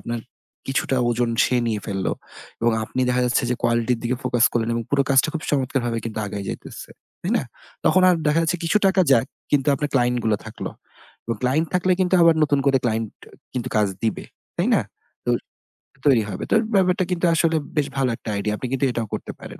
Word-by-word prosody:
আপনার 120 -1 -4 0.5
কিছুটা 135 0 0
ওজন 120 0 +1
সে 125 - +1
নিয়ে 110 -2 -1
ফেললো 95 -2 -1 0.5
এবং 115 0 +3
আপনি 130 - -3
দেখা 125 0 +2
যাচ্ছে 125 +2 +1
যে 125 - +2
quality 120 +1 +2
র - - -7
দিকে 120 +1 -1
focus 125 -2 +2
করলেন 115 -1 0
এবং 115 - -1
পুরো 140 -1 +3
কাজটা 135 +3 +4
খুব 155 - -3
চমৎকারভাবে 130 -4 0
কিন্তু 110 -1 -4
আগাই 100 0 -5
যাইতেছে, - - -7 0.3
তাই - - -2
না? - - 0 0.4
তখন 185 - +4
আর 180 - +5
দেখা 150 +2 +3
যাচ্ছে 165 +2 0
কিছু 165 - +2
টাকা 190 0 +3
যাক 130 0 +5 0.2
কিন্তু 145 -1 +2
আপনার 145 +2 -2
client 125 -1 +2
গুলো 110 -2 +2
থাকলো 110 - -6 0.5
এবং 115 - -2
client 145 +6 +2
থাকলে 185 0 +3
কিন্তু 185 0 +2
আবার 165 -1 +6
নতুন 145 -2 +3
করে 135 -1 +4
client 110 -1 0 0.2
আ - - -26 0.2
কিন্তু 125 - -2
কাজ 105 -1 +4 0.2
দিবে, 110 - -1 0.3
তাই - - +1
না? - - +3 0.4
তো - - +2 0.8
তৈরি 120 -6 +5
হবে। - - -5
তো - - +5 0.2
ব্যাপারটা 185 0 +3
কিন্তু 180 0 0
আসলে 165 0 +2 0.2
বেশ 145 -1 +2
ভালো 130 -2 +2
একটা 110 - -8
idea। 105 +1 -1
আপনি 130 - -4
কিন্তু 135 +1 +1
এটাও 115 -2 -3
করতে - - -4
পারেন। - - -10
125 Hz, 210 wpm, -22 LUFS, 115-150 Hz, 0.8 s, আবার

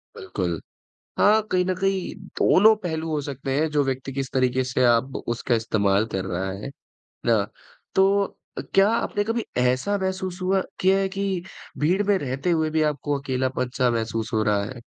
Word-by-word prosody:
बिल्कुल। 90 -3 -3 0.6
हाँ, 215 +2 +5
कहीं 180 -1 +2
न 185 - +1
कहीं 195 0 -1 0.2
दोनों 220 +3 +6
पहलू 160 -1 -2
हो 150 - 0
सकते 135 -1 -4
हैं 160 +2 +2
जो 145 -1 +2
व्यक्ति 135 0 -3
किस 135 0 -3
तरीके 130 0 +2
से 130 0 0
आप 120 +3 +2
उसका 120 +1 0
इस्तेमाल 105 -2 +1
कर 95 -1 -1
रहा, 95 +1 -2
है 100 +8 -6 0.6
ना? 110 -4 +3 0.5
तो 195 +1 +4 0.3
अ, - - -1
क्या 195 +1 +6
आपने 205 -2 0
कभी 225 +1 -1
ऐसा 130 +11 +1
महसूस 190 -1 -3
हुआ 190 +1 +2 0.2
किया 190 +1 +4
है 195 0 +1
कि 195 -2 -2 0.4
भीड़ 180 +7 +2
में 205 0 +2
रहते 135 +5 -2
हुए 160 -2 +1
भी 155 0 +1
आपको 145 +1 -2
अकेलापन-सा 130 -2 -1
महसूस 115 -1 -2
हो 110 -1 +2
रहा 105 -2 +2
है? 120 +2 -8
140 Hz, 175 wpm, -24 LUFS, 120-190 Hz, 0.6 s, दोनों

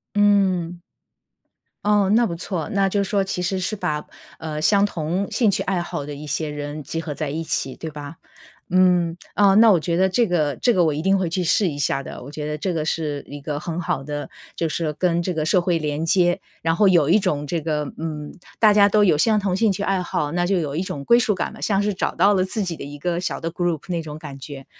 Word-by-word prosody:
嗯。 190 -4 +2 1.0
哦， 205 -2 +3
那 235 +1 +4
不 170 - -3
错。 170 0 -4
那 195 -2 +2
就 200 +1 0
是 195 - -4
说 200 -2 +1
其 190 - -3
实 185 +1 -1
是 185 +4 -2
把， 150 -6 -2 0.3
呃， 155 -1 -5
相 200 +5 +4
同 180 +1 -2
兴 230 -5 +2
趣 - - -1
爱 185 -3 -1
好 145 -4 -5
的 145 - -6
一 150 +2 -9
些 150 +1 -2
人 150 +1 -5
集 165 +4 -4
合 155 -2 -5
在 145 -1 -3
一 160 +3 -3
起， 135 -4 -2
对 160 - -7
吧？ 150 +2 -9 0.6
嗯， 180 -2 +3 0.2
啊， 200 -1 +5
那 220 0 +7
我 170 - +3
觉 170 +1 -1
得 190 +1 +3
这 230 +5 +2
个 155 -5 +1
这 245 - +2
个 180 -2 +4
我 155 - +2
一 150 - -3
定 195 +2 +3
会 180 -3 0
去 180 +2 -1
试 185 +4 +2
一 145 - -5
下 140 -1 0
的。 130 - -9
我 140 - -9
觉 150 0 -5
得 150 0 -3
这 185 +3 -2
个 155 -1 -1
是 150 -3 -2
一 145 0 -8
个 145 0 -4
很 170 +2 -4
好 135 -5 -2
的， 145 0 -5 0.3
就 165 - -1
是 155 -1 -2
跟 170 +2 0
这 180 - -2
个 155 -1 -1
社 180 +3 +3
会 175 -1 +1
连 150 +1 -2
接。 175 0 +3 0.2
然 165 0 +1
后 205 - +4
有 170 -6 +4
一 195 +6 +5
种 150 -6 -1
这 165 +2 -2
个， 150 -2 -2
嗯， 155 -2 -5 0.3
大 215 -2 +6
家 205 -1 +6
都 210 +1 +3
有 175 -7 +4
相 215 +5 +3
同 190 -2 0
兴 215 -1 +3
趣 200 - -4
爱 195 -2 +1
好， 150 -4 -2
那 175 0 0
就 190 -1 +1
有 145 -3 -3
一 175 - 0
种 145 -6 -5
归 235 - +5
属 215 -4 +2
感 - - -3
了， - - -12
像 200 -1 +1
是 210 0 0
找 - - -2
到 200 +4 +4
了 185 -1 +2
自 205 +2 -2
己 175 -3 -3
的 - - -7
一 145 +1 -8
个 170 +2 -1
小 185 - -3
的 165 - -3
group 175 -3 -1
那 175 -2 -1
种 155 -1 -8
感 145 -3 -9
觉， 135 0 -9
170 Hz, 285 characters per minute, -22 LUFS, 150-195 Hz, 1.0 s, 那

